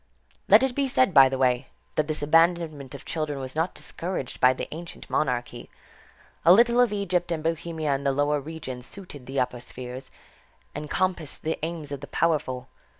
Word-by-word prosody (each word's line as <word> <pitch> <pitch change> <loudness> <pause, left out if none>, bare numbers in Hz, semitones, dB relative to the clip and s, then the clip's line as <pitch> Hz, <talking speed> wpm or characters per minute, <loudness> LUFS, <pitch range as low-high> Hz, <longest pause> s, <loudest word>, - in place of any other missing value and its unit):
Let - - +8
it 265 -2 +1
be 275 +1 0
said 255 -6 +3
by 135 -3 +8
the 135 - -2
way, 125 -2 +2 0.3
that 150 - 0
this 155 -1 -2
abandonment 160 -3 +2
of 140 - -11
children 155 -3 -3
was 130 0 -6
not 165 +3 -1
discouraged 170 -7 -5
by 125 - +6
the 130 - -4
ancient 170 +2 -8
monarchy. 120 -3 -1 0.7
A 170 - +7
little 235 +5 +6
of 245 -4 +3
Egypt 185 -4 -1
and 160 -2 -2
Bohemia 160 -2 -1
in 135 0 -2
the 140 - +2
lower 145 +1 +1
regions 130 -5 -7
suited 160 -10 -11
the 135 +1 -2
upper 125 -1 -1
spheres, 125 +1 -8 0.6
and 150 0 -6
compassed 180 -5 -1
the 160 0 -2
aims 160 -3 -4
of 140 -2 -5
the 145 - -8
powerful. 135 -6 0
155 Hz, 185 wpm, -26 LUFS, 135-170 Hz, 0.7 s, Let